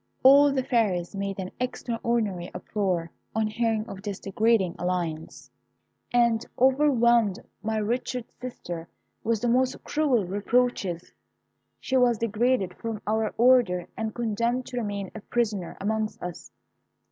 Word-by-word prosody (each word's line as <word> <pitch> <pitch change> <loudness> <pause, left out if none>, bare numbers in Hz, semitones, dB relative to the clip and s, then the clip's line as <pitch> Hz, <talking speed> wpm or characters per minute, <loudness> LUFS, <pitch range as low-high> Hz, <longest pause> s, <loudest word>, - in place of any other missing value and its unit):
"All 280 +2 +8
the 265 -1 0
fairies 200 -8 0
made 195 0 -3
an 185 -1 -5
extraordinary 230 -7 -1
uproar 180 -5 -2 0.2
on 220 0 +2
hearing 220 0 0
of 195 - -8
this 205 -2 -5
degrading 200 -2 +1
alliance, 160 -7 -3 0.6
and 235 -2 +3
overwhelmed 240 -6 +4 0.2
my 220 0 -1
wretched 240 +2 -2
sister 175 -9 -7 0.4
with 225 -1 0
the 240 - 0
most 255 +2 +1
cruel 275 -9 +1
reproaches. 200 -3 0 0.7
She 265 - 0
was 245 -2 +4
degraded 225 -3 +1
from 225 -2 -4
our 220 0 0
order, 235 -8 +4
and 220 -1 -3
condemned 235 +2 0
to 250 - -6
remain 205 -4 -3
a 220 - -8
prisoner 210 -6 -2
amongst 215 +2 -1
us. 175 -1 -7
220 Hz, 130 wpm, -26 LUFS, 195-240 Hz, 0.7 s, All